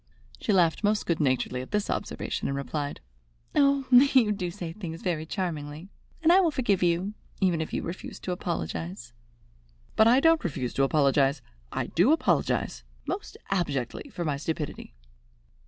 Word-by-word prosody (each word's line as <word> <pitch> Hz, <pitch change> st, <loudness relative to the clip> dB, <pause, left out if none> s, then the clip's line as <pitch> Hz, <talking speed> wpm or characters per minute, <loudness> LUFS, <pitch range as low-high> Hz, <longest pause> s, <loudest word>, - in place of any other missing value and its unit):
She -, -, -1 dB
laughed 175 Hz, -1 st, +3 dB
most 210 Hz, 0 st, +2 dB
good 170 Hz, -2 st, 0 dB
naturedly 130 Hz, -3 st, 0 dB
at 130 Hz, -, -9 dB
this 210 Hz, -1 st, 0 dB
observation, -, -, -3 dB
and 140 Hz, -, -2 dB
replied: 145 Hz, +1 st, -4 dB, 0.5 s
"Oh, 280 Hz, -2 st, +3 dB
you 250 Hz, -3 st, +6 dB
do 190 Hz, -4 st, -2 dB
say 170 Hz, -1 st, -6 dB
things 165 Hz, -4 st, -7 dB
very 160 Hz, -4 st, -1 dB
charmingly, 160 Hz, -2 st, -4 dB, 0.3 s
and 325 Hz, -, +6 dB
I 375 Hz, -, +7 dB
will 360 Hz, -3 st, +4 dB
forgive 240 Hz, -, +1 dB
you, 175 Hz, +3 st, +1 dB, 0.3 s
even 180 Hz, -4 st, +2 dB
if 160 Hz, -, -4 dB
you -, -, -2 dB
refuse 170 Hz, +3 st, -6 dB
to 185 Hz, -, -3 dB
apologize." 115 Hz, -, -4 dB, 0.8 s
"But 220 Hz, -, +6 dB
I 245 Hz, +3 st, +6 dB
don't 325 Hz, +2 st, +4 dB
refuse 135 Hz, -7 st, -3 dB
to 135 Hz, -, +2 dB
apologize. 140 Hz, -1 st, +2 dB, 0.3 s
I -, -, -2 dB
do 180 Hz, -, +3 dB
apologize 320 Hz, -, +1 dB, 0.2 s
most 405 Hz, +2 st, -5 dB
abjectly 150 Hz, -, -2 dB
for 175 Hz, -9 st, -4 dB
my 145 Hz, -3 st, 0 dB
stupidity." 150 Hz, -, -5 dB
170 Hz, 160 wpm, -27 LUFS, 145-210 Hz, 0.8 s, I